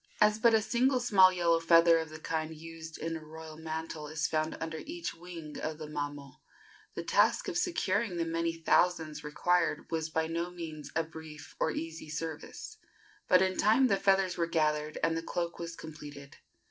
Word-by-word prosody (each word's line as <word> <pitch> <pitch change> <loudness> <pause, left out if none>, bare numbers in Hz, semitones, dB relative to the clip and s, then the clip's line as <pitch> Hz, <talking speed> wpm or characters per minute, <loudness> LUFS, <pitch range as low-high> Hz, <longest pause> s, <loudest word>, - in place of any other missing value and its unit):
As 210 0 +4
but 230 0 +5
a 220 - +3
single 255 +3 +2
small 195 -6 +6
yellow 170 -2 +2
feather 165 0 +6
of 160 -1 -4
the 155 - -8
kind 160 0 -3
used 160 0 -9
in 165 0 -3
a 160 - -7
royal 160 0 -10
mantle 160 -1 -5
is 155 +1 -2
found 155 0 -1
under 160 -1 -4
each 335 +2 -5
wing 165 -3 -9
of 155 0 -3
the 155 - -6
mamo, 145 -2 -5 0.6
the - - -3
task - - +3
of 380 - -3
securing 220 - 0
the 165 - 0
many 165 0 0
thousands 165 -2 +1
required 175 +3 +1
was 160 -1 -1
by 160 0 0
no 170 +2 -2
means 165 -4 -7
a 165 - +2
brief 160 -2 -11
or - - +2
easy 160 -1 -5
service; 155 0 -6 0.5
but 185 0 +6
in 185 0 0
time 225 +6 +5
the 200 - +4
feathers 195 -2 +2
were 170 - +2
gathered 150 -2 0
and 165 0 +2
the 165 - -1
cloak 170 +1 -3
was 170 -1 -5
completed. 145 -3 -10
165 Hz, 185 wpm, -31 LUFS, 155-180 Hz, 0.6 s, small